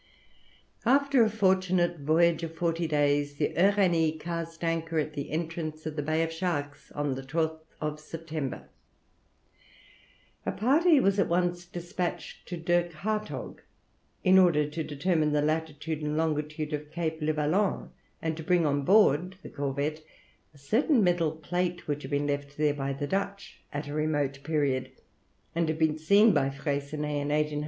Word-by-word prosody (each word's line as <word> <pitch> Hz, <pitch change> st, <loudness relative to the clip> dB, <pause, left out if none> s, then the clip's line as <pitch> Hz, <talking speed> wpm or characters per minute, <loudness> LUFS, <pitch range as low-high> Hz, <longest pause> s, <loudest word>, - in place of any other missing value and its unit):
After 275 Hz, 0 st, +4 dB
a 220 Hz, -, +3 dB
fortunate 185 Hz, -4 st, +2 dB
voyage 165 Hz, +3 st, +3 dB
of 165 Hz, -1 st, -5 dB
forty 165 Hz, 0 st, 0 dB
days, 145 Hz, -1 st, +1 dB
the 145 Hz, 0 st, -1 dB
Uranie 175 Hz, -5 st, +3 dB
cast 165 Hz, 0 st, -5 dB
anchor 165 Hz, 0 st, -1 dB
at 155 Hz, 0 st, -1 dB
the 140 Hz, -1 st, -5 dB
entrance 160 Hz, -1 st, -4 dB
of 155 Hz, -1 st, -4 dB
the 150 Hz, -, -1 dB
Bay 155 Hz, +2 st, +1 dB
of 165 Hz, 0 st, -3 dB
Sharks 160 Hz, -5 st, -3 dB
on 145 Hz, -2 st, -1 dB
the 130 Hz, -, -5 dB
12th 160 Hz, +1 st, -3 dB
September. 155 Hz, -3 st, -5 dB, 1.8 s
A -, -, -1 dB
party 300 Hz, -, +4 dB
was 200 Hz, -4 st, +2 dB
at -, -, +3 dB
once 175 Hz, 0 st, 0 dB
despatched 175 Hz, 0 st, -5 dB
to 175 Hz, -, -4 dB
Dirk 175 Hz, +1 st, +1 dB
Hartog, 215 Hz, +6 st, -4 dB, 0.6 s
in 190 Hz, 0 st, +6 dB
order 160 Hz, -5 st, +4 dB
to 155 Hz, +2 st, -4 dB
determine 155 Hz, +1 st, 0 dB
the 150 Hz, -, +3 dB
latitude 155 Hz, 0 st, -2 dB
and 150 Hz, 0 st, -2 dB
longitude 155 Hz, -1 st, -1 dB
of 150 Hz, 0 st, -4 dB
Cape 160 Hz, -1 st, -3 dB
Levaillant, 155 Hz, +6 st, 0 dB, 0.3 s
and 160 Hz, -1 st, -1 dB
to 160 Hz, -, -7 dB
bring 175 Hz, 0 st, +3 dB
on 145 Hz, -1 st, +1 dB
board 185 Hz, 0 st, +4 dB
the -, -, -8 dB
corvette 145 Hz, +2 st, -2 dB, 0.5 s
a 150 Hz, -, -20 dB
certain 225 Hz, -, +2 dB
metal 175 Hz, -3 st, +2 dB
plate 175 Hz, +2 st, -3 dB
which 145 Hz, 0 st, -2 dB
had -, -, -7 dB
been 145 Hz, 0 st, 0 dB
left 145 Hz, 0 st, -3 dB
there 150 Hz, -1 st, +2 dB
by 140 Hz, -1 st, -3 dB
the 140 Hz, +1 st, -3 dB
Dutch 200 Hz, +5 st, -3 dB
at 145 Hz, 0 st, -4 dB
a 145 Hz, -, -5 dB
remote 145 Hz, -3 st, -1 dB
period, 135 Hz, -4 st, 0 dB, 0.6 s
and 165 Hz, -1 st, 0 dB
had 155 Hz, -, -1 dB
been 160 Hz, -1 st, +1 dB
seen 200 Hz, +6 st, +5 dB
by 135 Hz, -5 st, +2 dB
Freycinet 145 Hz, +1 st, -2 dB
in 145 Hz, -, -3 dB
1801. 150 Hz, 0 st, 0 dB
160 Hz, 160 wpm, -28 LUFS, 150-175 Hz, 1.8 s, in